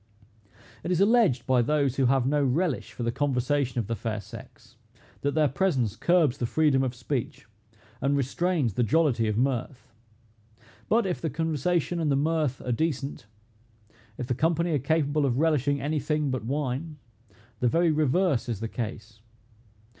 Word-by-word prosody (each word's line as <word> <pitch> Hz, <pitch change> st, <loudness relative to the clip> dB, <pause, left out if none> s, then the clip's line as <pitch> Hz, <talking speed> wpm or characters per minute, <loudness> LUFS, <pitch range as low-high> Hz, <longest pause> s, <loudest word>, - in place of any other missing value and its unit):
It -, -, -4 dB
is 180 Hz, -2 st, +1 dB
alleged 200 Hz, -, +3 dB
by 130 Hz, -2 st, +3 dB
those 140 Hz, 0 st, +1 dB
who 135 Hz, -2 st, +3 dB
have 135 Hz, -1 st, +2 dB
no 145 Hz, +2 st, +2 dB
relish 140 Hz, +2 st, 0 dB
for 120 Hz, -, -6 dB
the 115 Hz, -, 0 dB
conversation 135 Hz, 0 st, 0 dB
of 115 Hz, -, 0 dB
the 115 Hz, +3 st, -2 dB
fair 110 Hz, 0 st, -3 dB
sex, -, -, -13 dB, 0.5 s
that 145 Hz, +1 st, -1 dB
their 155 Hz, -1 st, +4 dB
presence 135 Hz, -, 0 dB
curbs 170 Hz, -3 st, +2 dB
the 120 Hz, -, -1 dB
freedom 150 Hz, -1 st, +2 dB
of 130 Hz, -2 st, -2 dB
speech, 120 Hz, -2 st, -4 dB, 0.6 s
and 140 Hz, +1 st, +1 dB
restrains 140 Hz, -, 0 dB
the 125 Hz, -, -1 dB
jollity 120 Hz, -1 st, +2 dB
of 105 Hz, 0 st, -1 dB
mirth. 130 Hz, +1 st, -2 dB, 1.0 s
But, 230 Hz, 0 st, +3 dB
if 180 Hz, -2 st, -2 dB
the 160 Hz, -, -1 dB
conversation 165 Hz, +3 st, -1 dB
and 155 Hz, -3 st, +1 dB
the -, -, +3 dB
mirth 150 Hz, -2 st, 0 dB
are 125 Hz, -, -1 dB
decent, 140 Hz, -2 st, -2 dB, 0.9 s
if 125 Hz, -, -4 dB
the 125 Hz, -, -1 dB
company 165 Hz, +5 st, +1 dB
are 150 Hz, -, +1 dB
capable 150 Hz, +1 st, +1 dB
of 130 Hz, -3 st, +1 dB
relishing 145 Hz, -2 st, +2 dB
any 150 Hz, +2 st, -1 dB
thing 150 Hz, -2 st, -1 dB
but 130 Hz, -3 st, -3 dB
wine, 145 Hz, +3 st, -3 dB, 0.6 s
the 125 Hz, -, +2 dB
very 165 Hz, +6 st, +3 dB
reverse 150 Hz, -, +1 dB
is 115 Hz, -5 st, -2 dB
the 115 Hz, -, -3 dB
case. 110 Hz, -2 st, -6 dB
140 Hz, 170 wpm, -27 LUFS, 125-160 Hz, 1.0 s, their